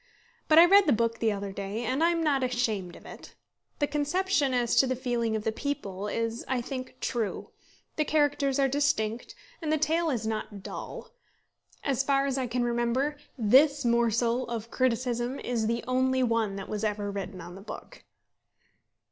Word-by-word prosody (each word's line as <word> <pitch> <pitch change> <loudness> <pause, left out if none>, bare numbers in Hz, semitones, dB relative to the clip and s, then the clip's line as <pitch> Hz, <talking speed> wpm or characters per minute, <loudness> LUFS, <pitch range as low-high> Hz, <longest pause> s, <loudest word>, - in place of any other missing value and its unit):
But 310 - +5
I 335 - +10
read 395 +1 +6
the 285 - +5
book 230 0 0
the 225 -1 +2
other 200 -1 -4
day, 200 +4 -4
and 260 +5 -1
am 335 0 +2
not 285 -4 +2
ashamed 225 -8 -1
of - - -15
it. - - -12 0.4
The 290 - +2
conception 295 +1 0
as 245 -2 +1
to 265 - +6
the 255 - 0
feeling 240 -3 -1
of 215 - -2
the 220 - 0
people 210 -7 -4
is, 230 +2 -2
I 260 -1 0
think, 255 +1 -6
true; 230 -4 -3 0.5
the 305 - +3
characters 290 -3 +1
are 275 -1 +3
distinct; 245 -5 -1 0.3
and 310 -2 -2
the 310 - +3
tale 320 +2 +1
is 235 -6 -2
not 215 -2 -4
dull. - - -7 0.7
As 270 -2 +1
far 275 0 +2
as 270 -1 -1
I 255 - -1
can 245 +1 -1
remember, 240 +5 0 0.2
this 270 +5 +4
morsel 235 +1 +2
of 230 -1 -5
criticism 245 0 0
is 230 -3 -1
the 235 +1 -1
only 260 0 +2
one 230 -4 0
that 195 -1 -6
was 210 0 -4
ever 205 -1 -1
written 195 -1 -5
on 175 +1 -9
the 190 - -10
book. 200 - -10
245 Hz, 180 wpm, -28 LUFS, 220-280 Hz, 0.7 s, I